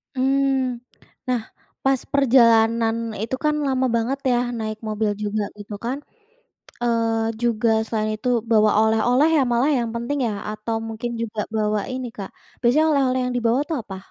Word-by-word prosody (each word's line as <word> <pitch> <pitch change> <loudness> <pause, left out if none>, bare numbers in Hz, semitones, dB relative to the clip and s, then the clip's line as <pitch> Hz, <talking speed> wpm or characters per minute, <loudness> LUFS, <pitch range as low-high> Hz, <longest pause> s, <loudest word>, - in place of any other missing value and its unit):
Mmm. 265 -2 +1 0.5
Nah 250 -2 +1 0.4
pas 270 0 +3 0.2
perjalanan 230 -4 +4 0.3
itu 225 +4 -2
kan 300 0 +2
lama 260 -1 +1
banget 240 +4 -1
ya 240 - +3 0.2
naik 215 -1 -3
mobil 215 0 0
juga 210 0 -1
gitu 205 0 -9
kan, 255 +3 -1 0.9
eee, 225 -1 +1
juga 230 -1 +1 0.2
selain 215 -1 -1
itu 250 - -2 0.2
bawa 215 -1 +5
oleh-oleh 240 +6 +3
ya 280 - +4
malah 245 +5 +2
yang 235 -1 -1
penting 235 +5 -2
ya? - - -2 0.2
Atau 215 +1 -3
mungkin 225 +2 -4
juga 220 -2 -3 0.2
bawa 210 -1 +1
ini 255 -1 -4
Kak, 195 -2 -6 0.3
biasanya 270 +6 +3
oleh-oleh 260 -2 +2
yang 250 - -2
dibawa 235 +1 +2
itu 325 - -6
apa? 195 -2 -8
235 Hz, 155 wpm, -22 LUFS, 220-260 Hz, 0.9 s, bawa